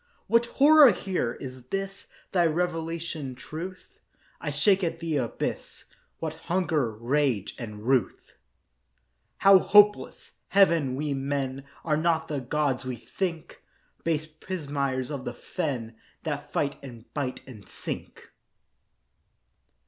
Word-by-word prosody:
What 230 +1 +3
horror 290 +1 +7
here! 180 -12 -2
Is 130 -1 -8
this 195 +4 -4 0.2
Thy 175 -3 +4
revelation, 165 -4 -2
Truth? 185 - -8 0.4
I - - -3
shake 195 -2 +3
at 165 -1 -1
the 165 -3 -1
abyss. 120 -4 -3 0.3
What - - -3 0.2
hunger, 165 -8 +1
rage, 120 -1 0
and 105 -3 -7
ruth, 130 -6 0 1.0
How 195 -1 +7
hopeless! 205 +2 +4 0.2
Heaven, 165 -9 +4
we 145 +1 -1
men 135 0 -2 0.2
Are 155 -2 +2
not 160 0 +1
the 145 -2 -1
gods 135 0 0
we 130 -1 -3
think!— 170 - -5 0.4
Base 160 -2 0
pismires 145 -5 -3
of 140 -3 -4
the - - -5
fen 125 -10 -4 0.3
That 145 -2 -4
fight 140 -1 0
and 120 -4 -10
bite 135 -4 -3
and 110 -7 -13
sink. - - -7
150 Hz, 120 wpm, -27 LUFS, 130-175 Hz, 1.0 s, horror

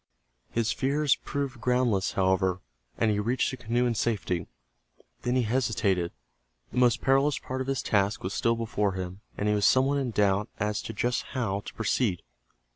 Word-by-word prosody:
His 115 -1 0
fears 140 +3 +2
proved 140 -4 -4
groundless, 125 -6 +1
however, 95 -1 +2 0.4
and 110 -2 +2
he 105 - 0
reached 120 +5 +1
the 130 - -6
canoe 120 +1 0
in 120 - +1
safety. 95 -7 -1 0.7
Then 125 +1 0
he 130 - +3
hesitated. 105 -7 +1 0.6
The - - -1
most 125 -2 +4
perilous 135 +2 +3
part 130 0 -4
of 130 - -4
his 135 -2 -1
task 100 0 +1
was 95 - -3
still 115 0 +2
before 105 -3 -1
him, 95 +1 -5 0.2
and 105 - -1
he 105 - +3
was 105 -1 +3
somewhat 135 +2 +3
in 130 -3 -1
doubt 105 -2 +1
as 105 0 -1
to 115 - -6
just 120 +4 0 0.2
how 100 -6 0
to - - -9
proceed. 110 -4 0
115 Hz, 180 wpm, -28 LUFS, 100-125 Hz, 0.7 s, most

